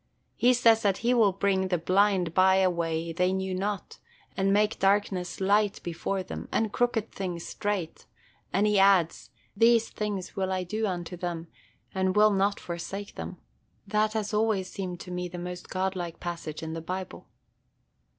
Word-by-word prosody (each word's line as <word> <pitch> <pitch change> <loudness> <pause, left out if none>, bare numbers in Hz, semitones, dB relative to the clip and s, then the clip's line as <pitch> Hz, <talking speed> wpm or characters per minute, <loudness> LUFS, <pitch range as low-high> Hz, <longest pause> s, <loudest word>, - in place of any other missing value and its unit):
He 250 +1 +4
says 230 -2 +5
that 200 -2 +2
he 245 - +4
will 225 -5 +5
bring 190 0 +1
the 180 -1 +1
blind 185 0 +2
by 190 +1 +5
a 190 -1 +4
way 165 -1 -2
they 180 +2 +2
knew 190 0 -2
not, 195 +1 -3 0.4
and 195 0 +1
'make 210 +2 +2
darkness 195 -2 +1
light 205 +1 +2
before 185 +3 -2
them, - - -7
and 220 -2 0
crooked 240 -3 0
things 180 -3 -4
straight'; 205 -6 -3 0.4
and 195 +3 +2
he 210 -1 +3
adds, 195 -4 +3 0.3
'These 230 +2 +4
things 205 -3 -4
will 190 -1 -1
I 185 -1 -1
do 215 +5 -2
unto 180 -1 -4
them, 170 -2 -5 0.4
and 190 0 0
will 210 0 +6
not 200 +1 +1
forsake 195 +4 -6
them.' 180 - -7 0.5
That 215 +1 +1
has 215 -1 -2
always 210 -3 +1
seemed 180 -3 -5
to 180 - -8
me 180 0 -3
the 180 0 -8
most 180 0 -6
godlike 185 -3 -3
passage 170 -3 -5
in 160 0 -4
the 165 - -4
Bible." 185 +3 -6
190 Hz, 170 wpm, -28 LUFS, 180-205 Hz, 0.5 s, will